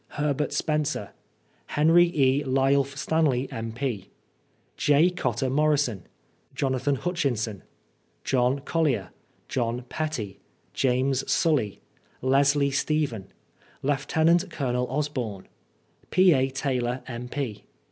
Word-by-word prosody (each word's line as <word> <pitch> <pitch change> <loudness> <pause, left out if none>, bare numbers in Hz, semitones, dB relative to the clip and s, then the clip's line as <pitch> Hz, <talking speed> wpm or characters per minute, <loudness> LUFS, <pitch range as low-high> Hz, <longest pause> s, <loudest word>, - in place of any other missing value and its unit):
Herbert 150 0 0
Spencer 150 -9 -1 0.6
Hen. 155 +3 +3
E 145 -6 +4
Lyulph 135 +1 +1
Stanley, 145 -6 +1
M.F. 115 -1 -4 0.7
J. 150 +5 +4
Cotter 130 -8 -1
Morison 140 - +1 0.5
Jonathan 135 0 0
Hutchinson 125 - -2 0.6
John 130 +1 +1
Collier 140 - 0 0.4
John 120 -1 -2
Pettie 150 - -4 0.3
James 130 0 +1
Sully 135 - +1 0.4
Leslie 140 +2 +3
Steimen 140 -7 -1 0.6
lient 160 +6 +2
CoL 125 -5 -2
Osborne 130 -8 -3 0.6
P. 185 -1 +5
A 135 -1 +2
Taylor, 130 -2 -2
M.P. 125 -1 -5
135 Hz, 90 wpm, -26 LUFS, 125-150 Hz, 0.7 s, P